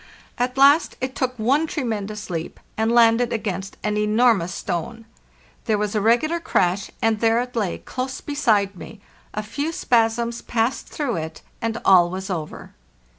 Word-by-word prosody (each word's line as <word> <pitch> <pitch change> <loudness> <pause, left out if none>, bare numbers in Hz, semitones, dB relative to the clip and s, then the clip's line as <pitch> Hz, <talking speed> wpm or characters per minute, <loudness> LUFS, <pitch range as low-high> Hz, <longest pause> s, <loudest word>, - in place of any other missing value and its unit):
At 250 +2 -1
last 280 +4 +5
it 260 0 -3
took 255 -1 -2
one 275 +8 +2
tremendous 215 - -4
leap, 165 -1 -5 0.2
and 220 +1 +1
landed 235 0 +4
against 195 -3 -4
an 210 0 0
enormous 210 -4 +3
stone. 220 +7 -4 0.6
There 220 -3 +2
was 210 0 -2
a 210 - +1
regular 240 +10 +2
crash, 190 - 0
and 225 -1 +2
there 225 +1 +3
it 245 0 -4
lay 205 -6 -1
close 260 +1 -5
beside 215 -9 +1
me; 205 +3 -11 0.4
a 215 - -2
few 285 +9 -3
spasms 235 -4 +1
passed 230 +2 -1
through 270 - -2
it, 160 0 -6 0.2
and 230 -1 -1
all 175 -2 +6
was 190 +2 -5
over. 160 -4 -6
225 Hz, 160 wpm, -22 LUFS, 205-250 Hz, 0.6 s, all